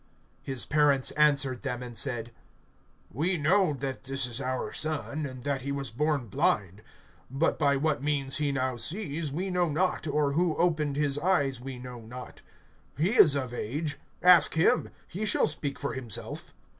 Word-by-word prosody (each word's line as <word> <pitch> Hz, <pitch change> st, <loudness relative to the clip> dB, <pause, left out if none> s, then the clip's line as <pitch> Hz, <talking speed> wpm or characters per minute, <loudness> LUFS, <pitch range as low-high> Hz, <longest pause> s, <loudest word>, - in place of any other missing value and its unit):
(20)His 135 Hz, -3 st, -2 dB
parents 145 Hz, -3 st, +3 dB
answered 140 Hz, -4 st, +3 dB
them 125 Hz, -3 st, -4 dB
and 120 Hz, -1 st, -9 dB
said: 120 Hz, -2 st, 0 dB, 0.8 s
We 170 Hz, -, +1 dB
know 165 Hz, +2 st, +2 dB
that 135 Hz, -1 st, -5 dB
this 135 Hz, -1 st, +1 dB
is 120 Hz, +1 st, -2 dB
our 130 Hz, -1 st, -3 dB
son, 155 Hz, -1 st, -2 dB
and 130 Hz, -2 st, -10 dB
that 140 Hz, -1 st, -2 dB
he 140 Hz, +2 st, -4 dB
was 140 Hz, -4 st, -3 dB
born 145 Hz, +1 st, 0 dB
blind. 100 Hz, -1 st, 0 dB, 0.5 s
(21)But 140 Hz, +5 st, 0 dB
by 140 Hz, -2 st, +3 dB
what 145 Hz, +1 st, 0 dB
means 140 Hz, -2 st, 0 dB
he 150 Hz, -2 st, 0 dB
now 130 Hz, -2 st, -1 dB
sees, 155 Hz, -, -1 dB
we 185 Hz, +6 st, -3 dB
know 180 Hz, -2 st, +1 dB
not; 160 Hz, +2 st, -1 dB
or 145 Hz, -1 st, +1 dB
who 165 Hz, +2 st, +1 dB
opened 155 Hz, -5 st, +1 dB
his 145 Hz, -1 st, 0 dB
eyes, 145 Hz, -7 st, +1 dB
we 130 Hz, 0 st, -7 dB
know 125 Hz, -1 st, -9 dB
not. 125 Hz, +3 st, -10 dB, 0.6 s
He 160 Hz, +6 st, +2 dB
is 160 Hz, -, +7 dB
of 130 Hz, -3 st, -3 dB
age; 140 Hz, +6 st, -3 dB, 0.2 s
ask 180 Hz, -4 st, +6 dB
him. 160 Hz, -, +2 dB, 0.2 s
He 195 Hz, +5 st, -5 dB
shall -, -, +3 dB
speak 145 Hz, -2 st, -1 dB
for 140 Hz, -, -3 dB
himself. 120 Hz, -6 st, -4 dB
140 Hz, 170 wpm, -28 LUFS, 130-155 Hz, 0.8 s, is